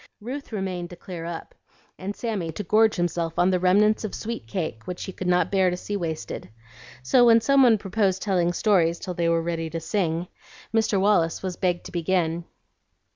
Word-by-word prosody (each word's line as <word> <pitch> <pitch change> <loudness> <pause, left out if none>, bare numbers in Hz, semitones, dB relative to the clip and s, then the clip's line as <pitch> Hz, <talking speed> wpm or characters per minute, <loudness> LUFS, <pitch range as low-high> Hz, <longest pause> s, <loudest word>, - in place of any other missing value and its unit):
Ruth 260 +6 -7
remained 185 -4 -3
to 175 - -9
clear 175 -2 -8
up, 170 -1 -6 0.5
and 195 +2 -4
Sammy 205 -9 -3
to 210 - -4
gorge 215 +3 +3
himself 170 -2 -2
on 180 +2 +4
the 185 - +2
remnants 205 +5 +3
of 215 - -4
"sweet 230 +1 -5
cake" 155 - -4
which 180 -1 -5
he - - -5
could 185 0 -5
not 180 -1 +2
bear 190 -2 +3
to 180 - -3
see 205 +3 -5
wasted. 160 - -4 0.5
So, 245 - +4
when 230 -1 +7
some 275 +4 +4
one 240 -4 +6
proposed 195 -1 0
telling 180 -4 +1
stories 175 -3 +2
till 180 - -5
they 170 -1 0
were 165 0 +2
ready 165 -1 -2
to 165 +1 -4
sing, 170 -1 -1 0.5
Mr. 220 -3 +2
Wallace 190 -5 +2
was 185 -2 -3
begged 175 -2 -1
to - - -8
begin. 170 -1 0
180 Hz, 195 wpm, -25 LUFS, 170-210 Hz, 0.5 s, when